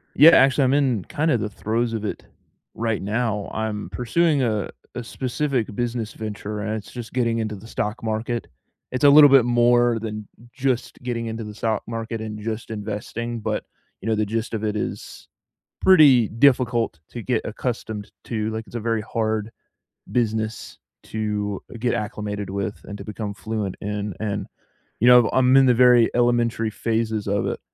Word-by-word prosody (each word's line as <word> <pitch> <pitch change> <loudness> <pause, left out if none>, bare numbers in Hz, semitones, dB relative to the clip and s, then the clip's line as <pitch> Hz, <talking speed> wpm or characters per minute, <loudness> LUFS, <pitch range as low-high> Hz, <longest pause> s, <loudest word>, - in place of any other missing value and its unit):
Yeah, 155 +4 +9
actually, 135 -2 +5
I'm 130 +1 +3
in 130 -8 +1
kind 155 +2 0
of 120 - +2
the 105 0 -2
throes 115 +3 -2
of 110 -1 -3
it - - -5 0.5
right 115 -1 -1
now. 105 0 -1
I'm 110 -1 -3
pursuing 140 +4 +1
a 110 -4 -1 0.3
a 125 - -4
specific 125 -2 -2
business 120 -2 -2
venture, 105 -1 -5
and 105 0 -3
it's 110 - -7
just 120 -2 -8
getting 115 -2 +1
into 110 -1 -2
the 100 +3 -12
stock 110 -1 -3
market. 115 +2 -2 0.4
It's 130 - -3
a 145 - +9
little 145 0 +9
bit 135 -3 +6
more 120 -1 +3
than 105 -2 -6 0.3
just 130 -2 -1
getting 115 -2 -3
into 115 0 -4
the 105 0 -7
stock 110 +1 -1
market 115 0 -4
and 110 -1 -6
just 110 +1 -5
investing, 110 +3 -4
but, - - -2 0.4
you 105 - -6
know, 110 - +2
the 110 0 +1
gist 115 +3 -3
of 110 - -4
it 105 -1 -1
is - - -6 0.5
pretty 145 - +6
difficult 120 - +2
to 120 - -7
get 120 0 0
accustomed 110 -2 -4
to, 110 -2 -2
like, 110 0 -5
it's 115 - -14
a - - -1
very 115 0 -1
hard 110 0 -2 0.6
business 110 -2 -2 0.2
to 105 -2 -3 0.2
get 120 0 +1
acclimated 105 -2 -4
with 100 +1 -3
and 100 - -7
to 100 - -9
become 105 -1 -5
fluent 105 -2 -3
in. 105 -1 -3
And, 105 -2 -2 0.5
you 120 - +5
know, 125 -2 +7
I'm 130 0 +4
in 135 -1 +6
the 125 - +5
very 125 -1 +6
elementary 120 -2 +2
phases 110 -1 -1
of 100 0 0
it. - - -3
115 Hz, 175 wpm, -23 LUFS, 105-120 Hz, 0.6 s, Yeah